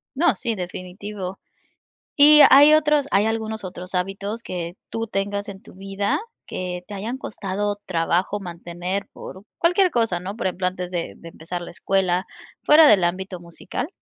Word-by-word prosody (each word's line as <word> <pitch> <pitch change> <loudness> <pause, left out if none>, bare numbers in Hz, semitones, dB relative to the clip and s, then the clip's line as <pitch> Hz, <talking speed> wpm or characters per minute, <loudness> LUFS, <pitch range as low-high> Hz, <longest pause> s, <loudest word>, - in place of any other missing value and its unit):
No, 340 +6 +3
sí, 235 -3 -2
definitivo, 185 +1 -6 0.8
¿y 300 +1 +8
hay 290 +3 +8
otros?, 300 -2 +2
¿hay 200 +2 +3
algunos 220 -1 -2
otros 180 0 -7
hábitos 200 +5 -3
que 175 -1 -5 0.2
tú 225 0 -3
tengas 200 0 -3
en 190 -1 -10
tu - - -15
vida 195 +1 -2 0.3
que 180 -1 -5
te 210 - -9
hayan 220 +6 -4
costado 205 -3 -3
trabajo 180 +3 0
mantener 175 +1 -5
por 190 - -10 0.2
cualquier 360 +2 +3
cosa, 225 - 0
¿no?, 195 +4 -6
por 230 - -5
ejemplo, 185 0 0
antes 180 -1 -4
de 175 -2 -4
de 170 - -11
empezar 175 +2 -7
la - - -9
escuela 185 0 0 0.4
fuera 305 +1 +8
del 205 -8 +6
ámbito 185 +1 -2
musical? 170 - -6
195 Hz, 165 wpm, -22 LUFS, 180-220 Hz, 0.8 s, y